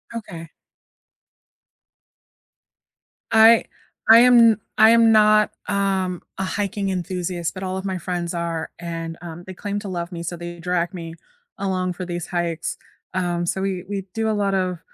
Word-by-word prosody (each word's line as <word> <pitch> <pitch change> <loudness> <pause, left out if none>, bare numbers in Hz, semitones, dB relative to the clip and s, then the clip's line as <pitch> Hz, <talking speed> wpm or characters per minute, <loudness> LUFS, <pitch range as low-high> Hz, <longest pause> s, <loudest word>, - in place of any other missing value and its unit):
Okay. 170 -8 -7 2.8
I 225 +1 +7 0.4
I 225 +1 +10
am 245 0 +7
n 230 -3 +6 0.2
I 220 +1 +7
am 230 -1 +6
not, 215 -1 +5 0.2
um, 190 -3 -1 0.2
a - - 0
hiking 200 +1 -2
enthusiast, 180 -2 -3
but 190 - -7
all 185 0 -3
of 190 - -6
my 190 -2 -2
friends 175 0 -3
are, 170 -1 -3
and, 165 -1 -5
um, 170 0 -8
they 190 - -8
claim 205 +2 -4
to 205 - -7
love 175 -1 -4
me, 170 -1 -6
so 170 +1 -4
they 175 0 -8
drag 175 0 -1
me 165 -2 -7 0.5
along 185 -2 -1
for 180 +1 -6
these 175 -1 -5
hikes, 170 -2 -2 0.4
um, 175 -1 -1
so 190 +2 -2
we 190 -2 -2
we 200 -2 -3
do 225 0 -1
a - - +1
lot 200 -2 0
of, 185 -2 -1
185 Hz, 165 wpm, -22 LUFS, 175-200 Hz, 2.8 s, I